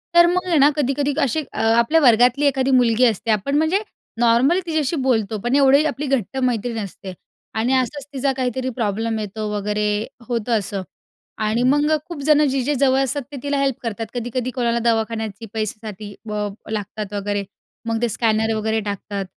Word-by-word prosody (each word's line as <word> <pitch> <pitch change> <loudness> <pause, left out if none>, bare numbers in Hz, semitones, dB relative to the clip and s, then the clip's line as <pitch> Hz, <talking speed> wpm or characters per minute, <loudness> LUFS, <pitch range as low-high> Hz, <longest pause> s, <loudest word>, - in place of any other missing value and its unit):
तर 345 0 +8
मग 365 0 -1
आहे 340 -3 +2
ना 285 +1 +6
कधी-कधी 285 0 0
अशी 280 +2 +1
अ, - - -6
आपल्या 235 +8 +3
वर्गातली 245 +2 +4
एखादी 270 -1 +2
मुलगी 245 -1 +4
असते 225 -1 +1
आपण 215 +7 0
म्हणजे 320 +6 +2 0.4
नॉर्मल 240 +9 +4
तिच्याशी 315 -2 0
बोलतो, 220 -4 +1
पण 240 +2 +1
एवढी 280 +1 +5
आपली 295 - -5
घट्ट 265 -3 -1
मैत्री 235 0 -2
नसते. 200 -3 -6 0.4
आणि 230 +4 +1
असंच 265 +2 -2
तिचा 275 0 0
काहीतरी 255 0 -1
प्रॉब्लेम 225 0 -1
येतो 215 +1 -4
वगैरे 210 +1 -1 0.4
होतं 235 -1 0
असं 200 0 -4 0.7
आणि 225 +3 +1
मग 290 +4 +3
अ, 310 - +4
खूप 335 -5 -7
जणं 300 0 +4
जे-जे 270 +2 0
जवळ 265 0 +3
असतात 285 +2 -2
ते 285 - -7
तिला 285 0 -1
हेल्प 275 -2 +1
करतात. 225 -1 -3
कधी-कधी 245 +1 -3
कोणाला 235 -2 0
दवाखान्याची 225 -1 -2
पैशासाठी 215 -1 -5 0.2
ब 210 0 -2 0.2
लागतात 210 -1 -4
वगैरे, 205 0 -2 0.4
मग 225 0 -1
ते 240 - +1
स्कॅनर 220 0 +1
वगैरे 220 +1 0
टाकतात 200 0 -4
240 Hz, 175 wpm, -21 LUFS, 220-275 Hz, 0.7 s, तर